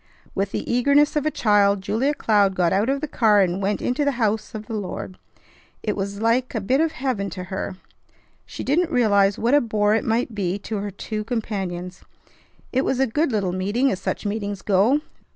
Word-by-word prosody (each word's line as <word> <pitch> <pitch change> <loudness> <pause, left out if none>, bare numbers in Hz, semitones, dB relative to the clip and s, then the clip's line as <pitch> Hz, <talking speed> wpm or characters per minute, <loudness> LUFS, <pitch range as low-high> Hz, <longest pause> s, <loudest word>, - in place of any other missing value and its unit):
With 195 0 -1
the - - -4
eagerness 285 +5 +3
of 300 0 +1
a - - +4
child 205 -6 +3
Julia 250 +9 0
Cloud 205 -6 +2
got 175 -2 +2
out 205 +6 +1
of 275 0 0
the 310 - -2
car 215 -7 +4
and 185 +1 0
went 200 +1 -1
into 250 +4 0
the 285 -1 +1
house 220 -2 -1
of 215 0 -6
the 225 - -7
Lord. 185 -2 -5 0.6
It 210 - -1
was 200 0 -4
like 235 +3 +1
a - - +1
bit 255 +9 +1
of 325 -1 +1
heaven 245 -7 -2
to 185 - -6
her. 190 0 -3 0.7
She - - -8
didn't 330 +5 +1
realize 205 - +3
what 235 +4 +1
a 290 - +6
bore 210 -2 +1
it 220 - +1
might 230 +1 0
be 195 -2 -1
to 210 +1 -5
her 205 +1 -3
two 215 +2 -5
companions. 190 -6 -4 0.7
It 260 +1 +2
was 260 - 0
a 270 - +4
good 295 +5 0
little 200 -5 0
meeting 205 +9 +1
as 190 - -3
such - - -3
meetings 205 -1 -3
go. 215 +9 +3
215 Hz, 205 wpm, -23 LUFS, 200-250 Hz, 0.7 s, a